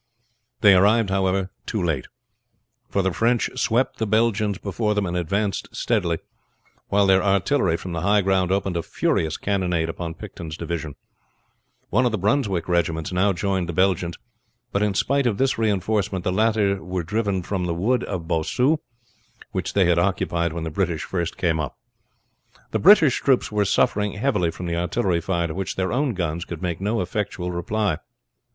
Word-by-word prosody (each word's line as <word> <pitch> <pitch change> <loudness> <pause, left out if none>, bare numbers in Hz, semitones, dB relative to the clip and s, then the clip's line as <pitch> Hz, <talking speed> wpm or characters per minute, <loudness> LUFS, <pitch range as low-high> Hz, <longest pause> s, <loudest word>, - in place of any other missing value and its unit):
They 100 -2 +8
arrived, 100 +2 +4
however, 95 -1 0 0.2
too 110 - -2
late; 80 -7 -1 0.8
for 100 - 0
the 95 -1 0
French 115 +3 +1
swept 120 +4 0
the 110 - 0
Belgians 110 -2 +1
before 105 +2 -1
them 105 -1 +1
and 90 -1 -3
advanced 100 +4 -1
steadily, 90 -8 0 0.7
while 100 0 +3
their 95 -1 +5
artillery 95 - +2
from 90 - -7
the 85 -1 -3
high 100 +3 +3
ground 95 -1 +1
opened 95 -2 0
a - - 0
furious 80 -1 -1
cannonade 90 -5 0
upon 80 0 -5
Picton's 80 -2 -8
division. 80 -4 -4 1.0
One 125 +5 +3
of - - -1
the 110 - -1
Brunswick 100 - 0
regiments 80 -2 0
now 95 +3 +2
joined 95 -1 -1
the - - -2
Belgians, 90 -2 +1 0.5
but 100 - 0
in 105 -2 +1
spite 140 +5 +2
of 105 -4 0
this 135 -3 +1
reinforcement 100 -3 0
the 90 - 0
latter 105 -3 +1
were 90 0 -3
driven 100 +1 -1
from 95 0 -2
the 85 - -1
wood 120 +8 +1
of 90 -4 -5
Bossu, 125 - +1 0.7
which - - -3
they 100 -2 +4
had 85 -1 +3
occupied 85 -2 0
when 85 0 -4
the 80 - -4
British 85 -2 -1
first 85 -3 -3
came 80 -3 +1
up. 70 -5 -4 0.9
The - - 0
British 165 - +6
troops 130 -5 +2
were 105 -1 +1
suffering 105 +1 +1
heavily 105 -6 +1
from 90 - -6
the 85 -1 -2
artillery 90 0 0
fire 85 -1 -1
to 80 - -4
which 95 +1 -3
their 95 -1 -1
own 130 -3 0
guns 85 -2 -2
could 85 -1 -7
make 85 -1 -2
no 110 +3 0
effectual 95 -1 -3
reply. 90 0 -1
95 Hz, 175 wpm, -23 LUFS, 85-105 Hz, 1.0 s, They